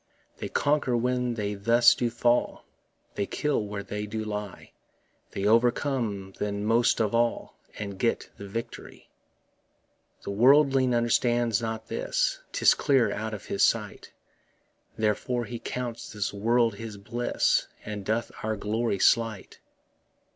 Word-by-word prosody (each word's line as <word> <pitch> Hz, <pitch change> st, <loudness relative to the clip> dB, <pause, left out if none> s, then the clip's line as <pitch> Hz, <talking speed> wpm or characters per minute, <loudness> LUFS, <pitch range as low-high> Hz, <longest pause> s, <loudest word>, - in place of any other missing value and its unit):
They -, -, -5 dB
conquer 145 Hz, -4 st, +1 dB
when 125 Hz, 0 st, 0 dB
they 105 Hz, -2 st, -2 dB
thus 115 Hz, +4 st, +5 dB
do 120 Hz, -, -1 dB
fall, 120 Hz, +1 st, 0 dB, 0.5 s
They 100 Hz, -, -2 dB
kill 145 Hz, -7 st, -1 dB
when 100 Hz, -1 st, -5 dB
they 105 Hz, +1 st, -4 dB
do 110 Hz, +1 st, -4 dB
die; 105 Hz, -2 st, -6 dB, 0.6 s
They 100 Hz, -, -4 dB
overcome 115 Hz, -3 st, +1 dB
then 100 Hz, 0 st, -2 dB
most 115 Hz, +2 st, +3 dB
of 110 Hz, -1 st, 0 dB
all, 120 Hz, 0 st, 0 dB, 0.2 s
And 100 Hz, -2 st, -6 dB
get 115 Hz, +2 st, -1 dB
the 100 Hz, -, -9 dB
victory. 115 Hz, +4 st, -7 dB, 1.1 s
The -, -, -4 dB
worldling 130 Hz, +3 st, +4 dB
understands 120 Hz, -1 st, +2 dB
not 110 Hz, -1 st, -4 dB
this, -, -, -1 dB
'Tis -, -, +5 dB
clear 130 Hz, -7 st, +2 dB
out 110 Hz, 0 st, -4 dB
of 100 Hz, -, -10 dB
his -, -, -3 dB
sight; -, -, 0 dB, 0.9 s
Therefore 110 Hz, +3 st, 0 dB
he 120 Hz, 0 st, -6 dB
counts 120 Hz, -1 st, -5 dB
this 105 Hz, -2 st, -3 dB
world 115 Hz, +1 st, +1 dB
his 110 Hz, -2 st, -7 dB
bliss, 120 Hz, +5 st, 0 dB, 0.2 s
And 105 Hz, -1 st, -5 dB
doth 110 Hz, +4 st, -1 dB
our 110 Hz, 0 st, -1 dB
glory 110 Hz, +1 st, -1 dB
slight. 115 Hz, -1 st, +1 dB
115 Hz, 135 wpm, -27 LUFS, 105-120 Hz, 1.1 s, thus